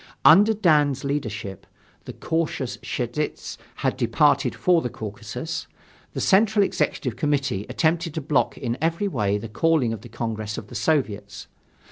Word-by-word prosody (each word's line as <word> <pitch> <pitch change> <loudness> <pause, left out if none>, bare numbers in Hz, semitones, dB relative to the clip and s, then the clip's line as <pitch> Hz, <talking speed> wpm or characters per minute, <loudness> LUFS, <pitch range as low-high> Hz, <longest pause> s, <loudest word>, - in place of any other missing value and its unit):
Under 205 +7 +7
Dan's 150 -8 +3
leadership 110 -8 -4 0.4
(the - - -7
cautious 145 -7 -2
Cheidze 120 +5 -4 0.3
had - - +1
departed - - +2
for 175 -2 +3
the 125 - -3
Caucasus), 110 +8 -6 0.5
the - - -4
Central 205 +1 +4
Executive 125 - -1
Committee 135 -6 -1
attempted 165 0 0
to 160 - -2
block 145 -1 0
in 120 -2 -3
every 165 +5 0
way 105 - 0
the 105 - -6
calling 135 0 +1
of 110 - -7
the 120 - -12
Congress 110 -2 -4
of 105 - -8
the - - -11
Soviets. 110 -6 -1
135 Hz, 145 wpm, -24 LUFS, 110-160 Hz, 0.5 s, Under